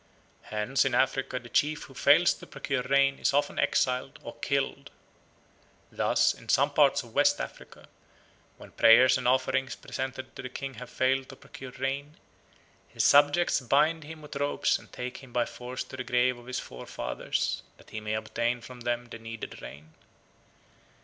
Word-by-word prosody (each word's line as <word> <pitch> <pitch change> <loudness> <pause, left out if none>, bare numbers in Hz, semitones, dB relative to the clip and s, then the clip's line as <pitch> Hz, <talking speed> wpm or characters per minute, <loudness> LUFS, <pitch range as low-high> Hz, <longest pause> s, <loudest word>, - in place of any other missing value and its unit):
Hence 110 +5 0
in 135 - 0
Africa 135 -1 +1
the 120 -1 -8
chief 150 +5 +1
who - - -13
fails - - +5
to - - -13
procure 135 -2 -2
rain 135 +1 +2
is - - +1
often 145 0 +1
exiled 130 +1 +1
or 115 - -7
killed. 140 +2 -2 1.0
Thus, - - +2
in - - -15
some 140 +2 +3
parts 140 -2 +4
of 115 -2 -15
West 145 +1 +3
Africa, - - -8 0.7
when - - -13
prayers 125 +3 +6
and - - -2
offerings 130 +1 +1
presented 130 0 -6
to - - -6
the 130 - -6
king 135 +1 -6
have 125 - -8
failed 130 +1 0
to - - -10
procure 130 - -11
rain, 140 +3 -3 0.7
his - - -2
subjects 145 +5 +5
bind 150 +6 +2
him 155 +1 -10
with 150 - -10
ropes 145 0 +1
and - - -18
take 125 0 -6
him 135 -2 -13
by 120 0 +1
force 125 +1 -6
to 130 - -10
the 130 - -3
grave 125 +1 +2
of 120 - -15
his 125 - -3
forefathers 60 0 -3 0.2
that - - -19
he 110 - -4
may 105 0 -2
obtain 120 +2 -1
from 125 +1 -11
them 120 0 -1
the 115 -1 -10
needed 115 0 -8
rain. 75 +3 -11
130 Hz, 175 wpm, -28 LUFS, 120-140 Hz, 1.0 s, prayers